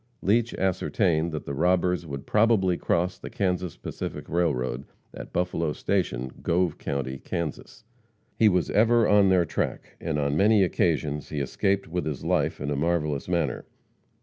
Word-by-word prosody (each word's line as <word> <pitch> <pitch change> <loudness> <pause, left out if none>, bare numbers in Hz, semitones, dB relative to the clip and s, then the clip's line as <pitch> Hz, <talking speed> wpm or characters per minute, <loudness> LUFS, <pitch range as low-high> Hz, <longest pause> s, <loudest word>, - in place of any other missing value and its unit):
Leach 115 +4 +2
ascertained 90 -3 +1
that 75 - -5
the 70 - -4
robbers 90 +3 +1
would 70 -1 -6
probably 105 -4 +3
cross 90 +2 -1
the - - -8
Kansas 90 - -2
Pacific - - -6
railroad 70 -7 -1 0.3
at - - -9
Buffalo 85 -3 -1
Station, 65 -12 -1
Gove 85 -1 0
county, 65 -1 -3
Kansas. 85 -3 -5 0.5
He 110 - +5
was 90 -3 +1
ever 115 +1 +4
on 100 -2 +5
their 90 -2 +4
track, - - -4
and 80 -2 -2
on 70 -1 0
many 105 +3 +5
occasions 75 -5 0
he 75 - -3
escaped 95 +8 0
with 80 -1 -3
his 75 -4 -4
life - - +1
in 70 +1 -3
a - - 0
marvelous 75 -2 -1
manner. 85 -2 -1
85 Hz, 155 wpm, -26 LUFS, 75-95 Hz, 0.5 s, He